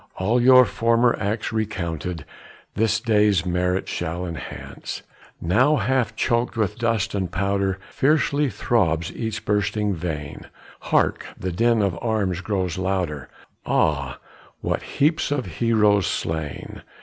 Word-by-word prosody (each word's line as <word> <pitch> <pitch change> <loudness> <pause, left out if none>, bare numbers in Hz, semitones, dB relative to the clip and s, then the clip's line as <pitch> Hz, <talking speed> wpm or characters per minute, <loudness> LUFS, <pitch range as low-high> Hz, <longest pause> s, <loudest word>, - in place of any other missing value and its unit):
All 110 +6 +2
your 130 0 +8
former 115 +3 +2
acts 105 +3 -2
recounted 90 -6 -3 0.5
This 110 +1 +1
day's 105 -6 +3
merit 90 +1 0
shall 85 +1 -3
enhance. 85 -3 -7 0.4
Now 125 - +3
half 130 -5 0
choked 120 +1 0
with 110 0 -1
dust 115 -4 0
and 95 -4 -2
powder, 100 0 0
Fiercely 145 0 +2
throbs 85 -9 0
each 110 -1 -4
bursting 105 0 0
vein: 80 -4 -5 0.4
Hark! - - +2
the 95 - -3
din 115 +4 +2
of 95 -4 -1
arms 100 -6 0
grows 95 -3 -2
louder, 90 -8 -2 0.3
Ah! 70 -5 0 0.4
what - - -1
heaps 155 +3 +1
of 145 -4 -1
heroes 105 +2 +2
slain! 80 -3 -4
100 Hz, 125 wpm, -23 LUFS, 90-115 Hz, 0.5 s, your